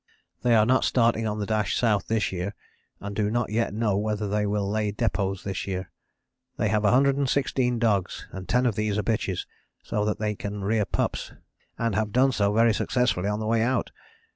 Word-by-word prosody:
"They 120 -1 +4
are 110 -1 +5
not 130 +3 +3
starting 115 -2 +2
on 105 0 -2
the 105 - -2
dash 105 0 0
South 105 -6 +1
this 110 -1 0
year 95 +2 -4 0.4
and 100 0 -6
do 105 0 +1
not 120 -1 -1
yet 115 +1 0
know 105 -1 0
whether 105 0 -1
they 105 +1 0
will 100 -1 0
lay 105 0 0
depôts 100 -3 -1
this 95 -1 -4
year. 95 -1 -4 0.7
They - - +1
have 105 - +2
116 135 0 +2
dogs 105 -5 0
and 95 -1 -8
ten 125 +1 +3
of 120 - +2
these 105 0 -1
are 105 - 0
bitches, 105 -5 -1 0.4
so 105 - -1
that 105 - 0
they 105 -1 -1
can 100 0 -5
rear 105 +1 +1
pups, - - -2 0.4
and 115 -2 0
have 105 +1 0
done 130 +3 +4
so 100 -4 +1
very 115 +1 +4
successfully 115 -5 0
on 105 0 -1
the 110 - -3
way 115 +1 +2
out. 125 +2 0
105 Hz, 200 wpm, -26 LUFS, 100-115 Hz, 0.7 s, are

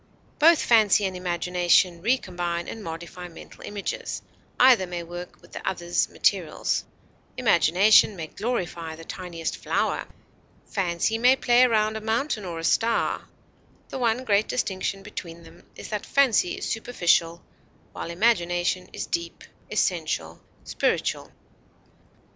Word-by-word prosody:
Both 330 +1 +6
fancy 215 -3 +4
and 190 -1 -3
imagination 175 0 +1
recombine 175 -7 -1
and 225 - -7
modify 170 +2 -7
mental 170 - -13
images; 205 -1 -5 0.4
either 245 -7 +6
may 175 -1 -5
work 175 +1 -9
with - - -18
the - - -8
other's 175 -2 -1
materials; - - 0 0.5
imagination 205 -1 +5
may 165 -3 -5
glorify 170 -5 -4
the 165 +1 -12
tiniest 170 -3 -5
flower; - - -1 0.6
fancy 190 +3 -1
may 250 +3 +6
play 245 -2 +3
around 215 -2 +1
a - - -7
mountain 220 0 -1
or 170 -2 -5
a 165 - -6
star; 230 +6 +1 0.6
the 265 - -5
one 240 +1 +1
great 210 -2 +2
distinction 195 -3 -2
between 170 -4 -8
them - - -17
is - - -9
that 210 -1 -3
fancy 255 -10 +2
is - - -4
superficial, 175 -7 +1 0.5
while - - -6
imagination 175 -2 +1
is - - -5
deep, 170 0 -4 0.3
essential, - - -1 0.2
spiritual. - - -1
185 Hz, 130 wpm, -25 LUFS, 170-225 Hz, 0.6 s, Both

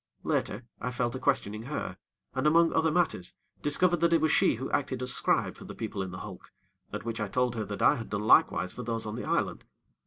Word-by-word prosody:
Later, 120 - -1
I 125 - -2
fell 125 -1 -1
to 130 - -5
questioning 110 -7 0
her, 150 - -4 0.4
and, - - +1
among 165 +2 +5
other 160 0 +3
matters, 155 - 0 0.3
discovered 175 +4 +2
that 170 0 +3
it 165 - +5
was 155 -1 +2
she - - +4
who 130 +4 -4
acted 130 -3 -1
as 125 - +1
scribe - - +1
for - - -12
the - - -8
people 105 -3 -4
in 95 - -3
the 90 - -7
hulk, - - -10 0.4
at - - -5
which 115 -1 -3
I 105 - -1
told 125 +3 +1
her 110 -2 -2
that 100 0 -4
I - - +5
had 115 - -7
done 105 0 -2
likewise 95 -3 +4
for - - -6
those 115 -1 -3
on 105 0 -4
the 120 - -5
island. - - -1
125 Hz, 240 wpm, -29 LUFS, 110-150 Hz, 0.4 s, among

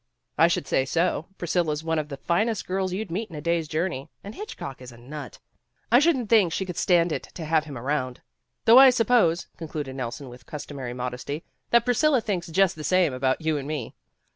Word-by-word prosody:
"I - - +5
should - - -1
say 130 - +1
so. 165 +3 0
Priscilla 170 -3 0
's 150 - -6
one 160 -1 0
of 150 -1 -4
the 140 - -6
finest 215 +8 0
girls 190 0 -1
you'd 190 0 -4
meet 210 +5 -3
in 165 - -10
a - - -5
day's 170 +1 0
journey, 155 -3 -2
and 205 - -8
Hitchcock 140 - -7
is 125 -1 -10
a 120 - -14
nut. 135 +2 -9 0.5
I 240 - +7
shouldn 290 -5 +2
't - - -13
think 210 -7 +5
she 190 - -1
could 180 -2 -6
stand 175 -1 +3
it - - -1
to 165 - -5
have 155 0 +2
him 145 -4 -7
around. 130 0 -2 0.5
Though 235 +3 +9
I 270 0 +10
sup 240 -3 +2
pose," 175 -9 +3
concluded 150 -5 -5
Nelson 130 +1 -5
with 125 0 -13
customary 140 -4 -6
modesty, 125 +5 -4 0.3
"that 235 -1 +4
Priscilla 260 +3 +3
thinks 200 -6 -3
just 185 +2 +2
the 155 - -8
same 185 -4 +2
about 130 +3 0
you 160 -1 0
and 140 - -7
me. 150 -6 -4
165 Hz, 220 wpm, -25 LUFS, 140-190 Hz, 0.5 s, I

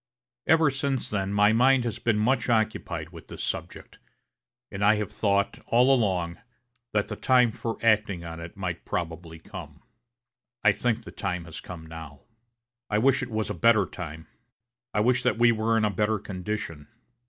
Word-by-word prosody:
Ever 160 -2 +5
since 135 -1 -2
then 100 -2 -1
my 105 +1 +4
mind 130 +2 +4
has 115 -2 -3
been 115 -3 +1
much 120 +2 +1
occupied 110 -8 0
with 85 -2 -12
this - - -7
subject, - - -5 0.7
and 100 - -3
I 105 +2 +6
have 105 -2 -3
thought, 100 -1 0
all 125 +3 +5
along, 90 -8 0 0.5
that 105 -1 +1
the - - -5
time 125 -3 +4
for 115 0 -4
acting 105 -5 +2
on 80 0 -7
it 85 +5 -9
might 90 -3 -4
probably 80 -1 -4
come. 80 -4 -10 0.8
I 105 - +7
think 115 +2 -1
the - - -10
time 90 -4 -3
has 80 -1 -8
come 85 -3 -9
now. 80 -3 -10 0.7
I 105 - +1
wish 135 +5 +3
it 125 - -4
was 110 -2 -2
a - - -2
better 110 +2 +4
time. 80 -3 -8 0.7
I 105 - +1
wish 125 +3 +3
that 125 -1 +1
we 120 0 +5
were 115 0 +1
in 110 - +2
a 105 - +1
better 105 +2 +1
condition. 95 -6 -5
105 Hz, 175 wpm, -27 LUFS, 85-115 Hz, 0.8 s, I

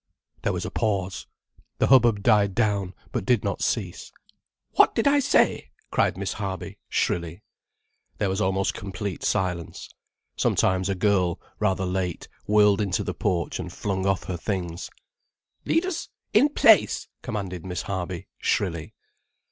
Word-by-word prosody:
There - - 0
was - - -3
a - - -5
pause. 100 -4 -1 0.5
The - - +3
hubbub 120 -6 +5
died 100 -3 +4
down 100 -5 0 0.2
but - - -2
did 115 +1 +2
not 100 - -2
cease. 95 -7 -2 0.6
"What - - +4
did 225 - +2
I 285 0 +5
say?" 275 - +2 0.2
cried - - +1
Miss 100 0 -2
Harby, 95 -3 -5
shrilly. 85 +3 -1 0.7
There 105 - 0
was 95 +2 -1
almost 95 0 +1
complete 100 -1 -5
silence. 90 -5 -2 0.4
Sometimes 95 +1 +1
a 100 - 0
girl, 90 -3 +1 0.2
rather 95 -2 +1
late, 90 -1 -2 0.2
whirled 105 -1 +4
into 100 -3 0
the - - -3
porch 85 -1 -1
and 90 -1 -5
flung 95 0 -2
off 95 -1 +1
her 90 - -4
things. 90 -2 -4 0.8
"Leaders—in 330 -4 +1
place," - - +4
commanded 95 -7 -4
Miss 90 -3 -4
Harby 95 -2 -4
shrilly. 85 -5 -1
95 Hz, 140 wpm, -25 LUFS, 90-105 Hz, 0.8 s, hubbub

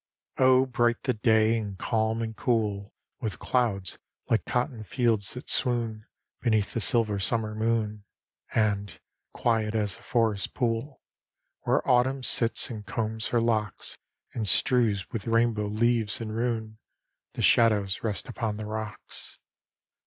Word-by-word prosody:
XL - - +2
Oh, 130 0 +6
bright 120 -2 0
the 130 - +1
day, 110 0 +3
and 100 -3 -6
calm 110 +2 0
and 110 -1 -5
cool 105 -5 -1 0.2
With 110 -5 -3
clouds, 105 -8 -1 0.3
like 115 - +2
cotton 125 -2 -2
fields 115 -3 +1
that 125 - -8
swoon 115 -4 0 0.3
Beneath 110 -4 +1
the - - -1
silver 110 -4 +3
summer 110 +1 -1
moon; 110 -2 -1 0.5
And, 100 -6 0 0.3
quiet 110 -2 0
as 105 -2 -1
a - - -19
forest 115 -5 0
pool, 120 +2 -2 0.6
Where - - +1
Autumn 130 +2 +2
sits 115 0 +3
and 110 -3 -6
combs 110 +1 -3
her 120 - +1
locks, 110 -3 -1 0.3
And 110 -4 -2
strews 110 -6 +2
with 110 -3 -5
rainbow 115 -2 +2
leaves 110 0 +1
and 110 -2 -5
roon, 110 -2 -2 0.5
The - - -3
shadows 105 -4 +3
rest 105 -3 -2
upon 110 -4 -3
the 110 - -5
rocks. 110 0 -7
110 Hz, 140 wpm, -27 LUFS, 105-120 Hz, 0.6 s, Oh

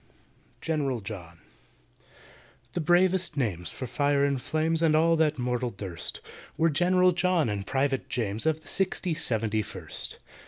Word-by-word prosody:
GENERAL 140 -7 -1
JOHN 90 -5 -8 1.4
THE 175 - -1
bravest 175 0 +3
names 95 -10 -1
for 130 - -6
fire 140 +3 +2
and 140 -2 0
flames 160 +3 0
And 160 -2 +4
all 165 +1 +4
that 155 -2 +2
mortal 125 0 -1
durst, 95 -5 -5 0.4
Were 165 0 +3
GENERAL 180 +4 +4
JOHN 175 -5 +1
and 100 -2 -3
PRIVATE 135 +2 0
JAMES, 115 +2 -2
Of 160 0 +1
the - - -18
Sixty 185 -2 0
seventy 110 -8 0
first. - - -6
145 Hz, 145 wpm, -27 LUFS, 115-165 Hz, 1.4 s, And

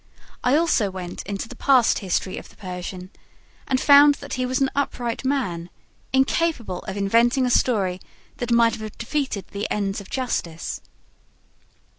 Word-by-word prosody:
I 250 +3 +3
also 305 -10 +2
went 185 -2 -6
into 200 +3 -4
the 250 - -10
past 255 -2 +4
history 190 -1 -2
of - - -13
the - - -19
Persian 180 -1 -7 0.6
and 260 - +1
found 285 +1 +7
that - - -8
he 255 0 -1
was 260 +2 0
an 270 -1 +1
upright 245 -4 -2
man, 205 -12 -1 0.4
incapable 265 - +1
of 190 - -5
inventing 235 +6 +3
a 250 - 0
story 195 -8 +1 0.4
that 245 - -4
might 235 -1 +4
have 215 -1 -8
defeated 260 -4 -3
the 205 +1 -4
ends 200 -1 -1
of 195 - -14
justice. 175 -11 -3
230 Hz, 155 wpm, -23 LUFS, 195-260 Hz, 0.6 s, found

